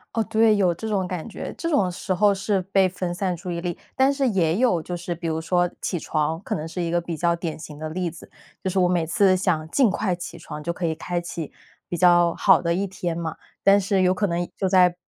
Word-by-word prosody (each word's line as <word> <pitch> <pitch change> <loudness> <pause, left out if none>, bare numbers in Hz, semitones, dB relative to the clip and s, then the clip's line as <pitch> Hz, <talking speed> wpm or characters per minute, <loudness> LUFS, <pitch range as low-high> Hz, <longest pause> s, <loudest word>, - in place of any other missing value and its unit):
哦， 225 - +2
对， 220 -1 +5
有 185 -3 +3
这 220 +6 -6
种 195 -4 0
感 180 0 -5
觉。 220 - -6
这 335 - -2
种 275 - +2
时 185 +1 -3
候 205 +3 +4
是 195 0 0
被 190 0 +2
分 180 -1 -4
散 180 0 -1
注 175 +2 -7
意 170 -1 -3
力， 175 -1 -3 0.2
但 270 +1 +4
是 275 -2 +1
也 175 -6 +1
有， 235 -9 +3
就 175 +3 -5
是 175 0 -5
比 170 0 -5
如 160 0 -1
说 175 +2 +1
起 180 - -1
床， 160 +1 -1
可 - - -2
能 155 - -4
是 180 - -5
一 170 - -1
个 175 +1 +1
比 170 -1 -5
较 170 +1 +2
典 170 -2 -4
型 155 -2 -9
的 155 - -4
例 180 +2 -2
子， 160 -1 -11 0.3
就 190 - -1
是 190 - -1
我 180 -1 +4
每 175 -2 +1
次 185 +4 +3
想 170 -4 0
尽 255 -1 +4
快 190 -1 0
起 175 0 -8
床， 150 - -8
就 170 - -2
可 175 0 -3
以 160 - 0
开 175 +2 -3
启 170 -2 -6 0.4
比 175 - -2
较 175 -1 +5
好 - - +5
的 170 -1 +1
一 195 +3 0
天 175 -3 -4
嘛， 160 -2 -3 0.3
但 200 +1 +6
是 190 0 +1
有 185 0 +3
可 205 +2 0
能， 175 0 -1
就 190 - 0
在 180 -2 +5
180 Hz, 280 characters per minute, -24 LUFS, 170-195 Hz, 0.4 s, 但